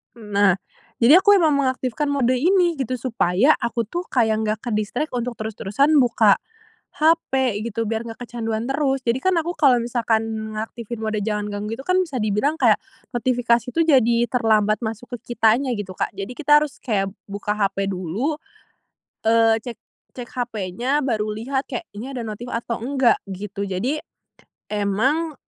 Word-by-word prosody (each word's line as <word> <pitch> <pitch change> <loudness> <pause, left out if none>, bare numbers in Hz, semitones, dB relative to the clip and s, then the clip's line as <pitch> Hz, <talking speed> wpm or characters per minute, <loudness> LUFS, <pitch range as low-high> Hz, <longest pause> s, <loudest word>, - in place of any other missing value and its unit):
Nah, 205 -4 +2 0.4
jadi 275 +9 +7
aku 405 +1 +5
emang 330 -5 +4
mengaktifkan 260 0 -1
mode 275 -4 +1
ini, 350 0 +2
gitu. 255 -1 -1
Supaya, 230 - +2
aku 235 0 -1
tuh, 345 - -5
kayak 225 -4 +2
nggak 215 +1 0
ke-distract, 235 +6 -2
untuk 245 -1 -3
terus-terusan 220 +6 0
buka 230 -5 +4 0.6
hape, 265 -8 +2
gitu, 230 0 -2
biar 225 +1 -2
nggak 225 - -9
kecanduan 225 -2 -3
terus. 270 -1 0
Jadi 240 +1 +1
kan, 375 +6 +1
aku, 335 +2 -2
kalau 260 -5 +5
misalkan 230 -2 0 0.3
mengaktifin 225 +1 -6
mode 215 -1 -1
jangan 210 -1 -2
ganggu 210 +2 -4
itu, - - -7
kan, 365 +4 +2
bisa 335 -7 -2
dibilang 215 +9 +1
kayak, - - +4 0.4
notifikasi 240 -1 +1
tuh 330 - +4
jadi, 255 -7 +4
terlambat 215 -3 +2
masuk 225 +3 -5
ke 240 - -8
kitanya, 230 +4 +3
gitu, 205 -3 -5
Kak. - - -2
Jadi 195 +4 -5
kita 295 0 +5
harus 295 -2 -7
kayak, 195 -5 -1 0.2
buka 200 +1 -4
hape 195 -1 0
dulu, 190 - -2 0.9
eee, 225 0 +4
cek 240 -1 -7 0.4
cek 245 -2 -7
hapenya, 240 +3 -1
baru 215 -5 -1
lihat, 265 +5 -2
kayak, 245 - -4
"Ini 240 +6 -6
ada - - -3
notif 220 +2 -6
atau 230 0 -3
enggak," 260 -2 +3 0.2
gitu. 200 +1 -5
Jadi, 200 +9 -1 0.8
emang, 235 +11 0
235 Hz, 160 wpm, -22 LUFS, 215-270 Hz, 0.9 s, jadi